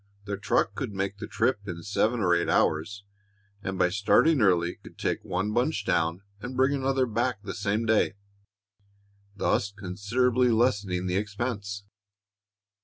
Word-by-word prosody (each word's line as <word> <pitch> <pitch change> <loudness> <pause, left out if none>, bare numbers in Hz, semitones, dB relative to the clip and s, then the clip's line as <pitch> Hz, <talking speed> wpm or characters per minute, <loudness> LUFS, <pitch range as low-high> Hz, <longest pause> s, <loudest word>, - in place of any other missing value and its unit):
The 100 0 -3
truck 100 - +1
could - - -4
make 100 +1 -3
the - - -5
trip - - +1
in 85 -2 -6
seven 110 +4 +1
or 90 -3 +3
eight 85 0 +1
hours, 100 +6 +1 0.6
and 95 -1 -4
by 90 - +3
starting 110 - +3
early 90 -4 +2
could - - -14
take - - -2
one 95 +3 -2
bunch 125 +8 0
down 85 0 0 0.2
and 125 +3 -6
bring 135 +2 +3
another 135 -1 +1
back 120 -1 -1
the 100 - -5
same 105 +3 -1
day, 110 -3 +2 1.2
thus 100 -1 0
considerably 115 +6 +1
lessening 105 -6 +1
the 90 0 0
expense." 105 -1 -3
100 Hz, 150 wpm, -27 LUFS, 95-120 Hz, 1.2 s, or